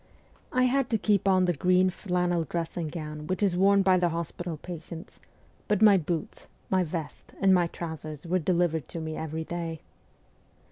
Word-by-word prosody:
I 255 Hz, -, +2 dB
had 255 Hz, 0 st, +2 dB
to 225 Hz, -, +2 dB
keep 205 Hz, -2 st, +1 dB
on 185 Hz, -1 st, +4 dB
the 175 Hz, -, +2 dB
green 185 Hz, +4 st, +3 dB
flannel 180 Hz, -2 st, 0 dB
dressing 165 Hz, +1 st, -3 dB
gown 150 Hz, -1 st, -6 dB
which 185 Hz, +2 st, -1 dB
is 190 Hz, -3 st, +2 dB
worn 195 Hz, +2 st, +4 dB
by 185 Hz, -1 st, +5 dB
the 175 Hz, -1 st, +2 dB
hospital 170 Hz, 0 st, -4 dB
patients, 170 Hz, 0 st, -9 dB, 0.5 s
but 210 Hz, -, +2 dB
my 210 Hz, -2 st, +8 dB
boots, 170 Hz, -2 st, -3 dB, 0.2 s
my 185 Hz, -1 st, +3 dB
vest, 160 Hz, -2 st, -6 dB
and 195 Hz, -1 st, +5 dB
my 175 Hz, -2 st, +4 dB
trousers 160 Hz, -2 st, -7 dB
were 180 Hz, +2 st, +1 dB
delivered 170 Hz, -3 st, +1 dB
to 170 Hz, -, -6 dB
me 160 Hz, -1 st, -4 dB
every 160 Hz, 0 st, -4 dB
day. 165 Hz, -1 st, -5 dB
175 Hz, 175 wpm, -28 LUFS, 160-185 Hz, 0.5 s, my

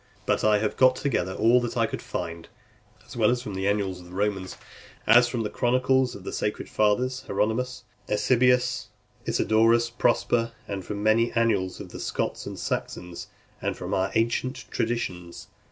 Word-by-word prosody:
But -, -, +1 dB
I 105 Hz, -1 st, +5 dB
have 105 Hz, 0 st, -2 dB
got 130 Hz, 0 st, +5 dB
together 95 Hz, -10 st, -1 dB
all 120 Hz, +3 st, +4 dB
that 120 Hz, -, -4 dB
I -, -, +3 dB
could -, -, -5 dB
find 85 Hz, 0 st, -5 dB, 0.6 s
as -, -, -12 dB
well 120 Hz, +1 st, +3 dB
from 120 Hz, -4 st, -6 dB
the 95 Hz, +1 st, -2 dB
annals 100 Hz, -3 st, 0 dB
of 90 Hz, -, -13 dB
the 90 Hz, -, -13 dB
Romans 100 Hz, -2 st, -2 dB, 0.5 s
as 120 Hz, +2 st, +6 dB
from 120 Hz, -2 st, -2 dB
the 105 Hz, -, -2 dB
chronicles 130 Hz, +1 st, +2 dB
of 100 Hz, -, -10 dB
the -, -, -6 dB
sacred 105 Hz, -, -2 dB
fathers, 125 Hz, +5 st, +1 dB
Hieronymus, 110 Hz, +5 st, -1 dB, 0.3 s
Eusebius, 125 Hz, +1 st, +2 dB, 0.4 s
Isidorus, 115 Hz, +2 st, +3 dB
Prosper, 115 Hz, 0 st, +1 dB
and 100 Hz, -2 st, -4 dB
from 100 Hz, +2 st, -5 dB
the 115 Hz, +2 st, +3 dB
annals 115 Hz, -6 st, +1 dB
of -, -, -8 dB
the -, -, -9 dB
Scots -, -, -3 dB
and -, -, -6 dB
Saxons, 90 Hz, -1 st, -4 dB, 0.3 s
and -, -, -2 dB
from -, -, -5 dB
our 95 Hz, +1 st, +1 dB
ancient 115 Hz, +4 st, 0 dB
traditions. 90 Hz, -7 st, -3 dB
110 Hz, 170 wpm, -26 LUFS, 100-120 Hz, 0.6 s, as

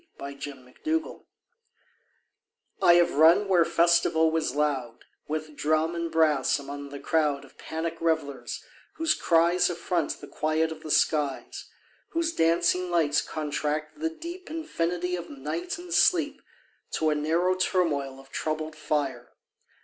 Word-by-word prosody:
SCENES 140 Hz, 0 st, -6 dB
OF 130 Hz, -3 st, -13 dB
THE 320 Hz, +1 st, +2 dB
MIND 320 Hz, -, -11 dB, 1.6 s
I 175 Hz, -, +7 dB
have 175 Hz, 0 st, +4 dB
run 165 Hz, +7 st, +6 dB
where 180 Hz, -3 st, +5 dB
festival 170 Hz, -1 st, +3 dB
was 160 Hz, -5 st, -1 dB
loud 135 Hz, -6 st, -1 dB, 0.2 s
With 155 Hz, 0 st, -4 dB
drum 155 Hz, +3 st, +1 dB
and 170 Hz, -1 st, -3 dB
brass 155 Hz, -4 st, +3 dB
among 140 Hz, 0 st, -7 dB
the 140 Hz, 0 st, -8 dB
crowd 150 Hz, -3 st, 0 dB
Of 135 Hz, -, -21 dB
panic 160 Hz, +1 st, -4 dB
revellers, 160 Hz, -4 st, -2 dB, 0.3 s
whose 325 Hz, -1 st, +2 dB
cries 170 Hz, +2 st, +3 dB
Affront 170 Hz, -2 st, -2 dB
the -, -, -9 dB
quiet 155 Hz, +1 st, 0 dB
of 160 Hz, -1 st, -8 dB
the 155 Hz, -, -8 dB
skies; 150 Hz, -3 st, 0 dB, 0.4 s
Whose 330 Hz, 0 st, 0 dB
dancing 170 Hz, -, +2 dB
lights 160 Hz, -4 st, +2 dB
contract 150 Hz, -, -3 dB
the 325 Hz, +1 st, 0 dB
deep 340 Hz, +3 st, -9 dB
Infinity 180 Hz, -, -2 dB
of 175 Hz, -1 st, -7 dB
night 155 Hz, -, -4 dB
and 350 Hz, 0 st, -7 dB
sleep 340 Hz, -6 st, +3 dB, 0.5 s
To 155 Hz, -1 st, +1 dB
a -, -, +3 dB
narrow 165 Hz, +5 st, +1 dB
turmoil 155 Hz, -8 st, 0 dB
of 135 Hz, 0 st, -17 dB
troubled 155 Hz, 0 st, -3 dB
fire. 145 Hz, -5 st, -2 dB
160 Hz, 140 wpm, -27 LUFS, 150-175 Hz, 1.6 s, I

